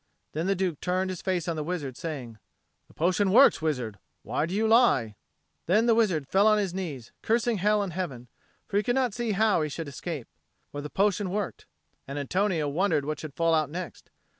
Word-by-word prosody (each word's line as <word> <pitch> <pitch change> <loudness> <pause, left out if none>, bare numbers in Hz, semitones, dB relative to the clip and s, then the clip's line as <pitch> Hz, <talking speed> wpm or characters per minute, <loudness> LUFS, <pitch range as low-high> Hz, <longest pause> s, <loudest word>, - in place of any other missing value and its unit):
Then 160 +4 -2
the 195 - +2
Duke 180 -5 -2
turned 185 +1 0
his 185 - -6
face 180 -3 -1
on 170 - -1
the 155 - -3
wizard, 150 -6 -4
saying, 125 -9 -6 0.5
"The - - -21
potion 185 +4 +2
works, 255 -1 +6
wizard. 125 -10 -2 0.2
Why 155 - -1
did 180 - -4
you 220 +2 +2
lie?" 220 - +4 0.5
Then 210 +7 +4
the 235 - +5
wizard 185 -11 +1
fell 195 +6 +4
on 215 0 +5
his 195 -4 -1
knees, 155 -11 -5
cursing 230 -1 +1
hell 210 +2 +2
and 185 -4 -5
heaven; 135 -10 -4 0.4
for 200 - -1
he 205 - +2
could 245 +1 0
not 255 -5 +1
see 235 -2 -1
how 215 -3 +3
he 155 - -1
should 160 +1 -5
escape. 145 -2 -6 0.4
For 145 - -5
the 150 - -6
potion 200 +1 +1
worked. 205 +1 -4 0.4
And 140 +1 -5
Antonio 165 +2 0
wondered 155 -1 +1
what 155 0 -3
should 150 -3 -8
fall 165 0 +2
out 155 -3 +2
next. 175 +3 -7
180 Hz, 210 wpm, -27 LUFS, 150-205 Hz, 0.5 s, works